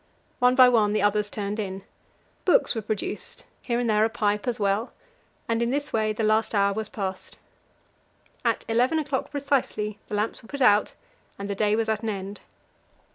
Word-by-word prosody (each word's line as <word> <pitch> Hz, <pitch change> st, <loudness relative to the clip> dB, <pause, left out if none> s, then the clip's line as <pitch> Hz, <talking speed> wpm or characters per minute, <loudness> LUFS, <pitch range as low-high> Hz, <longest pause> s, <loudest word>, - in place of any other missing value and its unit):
One 250 Hz, 0 st, +4 dB
by 255 Hz, -1 st, +8 dB
one 220 Hz, -4 st, +3 dB
the 210 Hz, -1 st, +1 dB
others 205 Hz, 0 st, +2 dB
turned 205 Hz, +1 st, -4 dB
in; 190 Hz, -2 st, -4 dB, 0.6 s
books -, -, +4 dB
were 225 Hz, -, -3 dB
produced 215 Hz, 0 st, -5 dB, 0.2 s
here 235 Hz, -2 st, -1 dB
and 245 Hz, -, 0 dB
there 215 Hz, -1 st, +3 dB
a 225 Hz, -, +3 dB
pipe 210 Hz, -1 st, -1 dB
as 240 Hz, -3 st, -1 dB
well 200 Hz, +3 st, 0 dB, 0.5 s
and 230 Hz, 0 st, 0 dB
in 235 Hz, -, +1 dB
this 285 Hz, +3 st, -2 dB
way 215 Hz, -1 st, +1 dB
the 215 Hz, +1 st, -3 dB
last 215 Hz, +1 st, +2 dB
hour 200 Hz, 0 st, +3 dB
was 215 Hz, 0 st, -4 dB
passed. 190 Hz, -6 st, -5 dB, 1.1 s
At -, -, 0 dB
eleven 245 Hz, +7 st, +2 dB
o'clock 290 Hz, -4 st, -2 dB
precisely 265 Hz, -7 st, -1 dB
the 210 Hz, -, -4 dB
lamps 210 Hz, +2 st, -2 dB
were 225 Hz, -, -17 dB
put 280 Hz, -, -5 dB
out, 210 Hz, -4 st, +4 dB, 0.4 s
and 200 Hz, -, -5 dB
the 200 Hz, -, -2 dB
day 210 Hz, +1 st, +2 dB
was 225 Hz, 0 st, 0 dB
at 220 Hz, -1 st, 0 dB
an 225 Hz, -, -2 dB
end. 200 Hz, 0 st, -5 dB
215 Hz, 190 wpm, -25 LUFS, 205-240 Hz, 1.1 s, by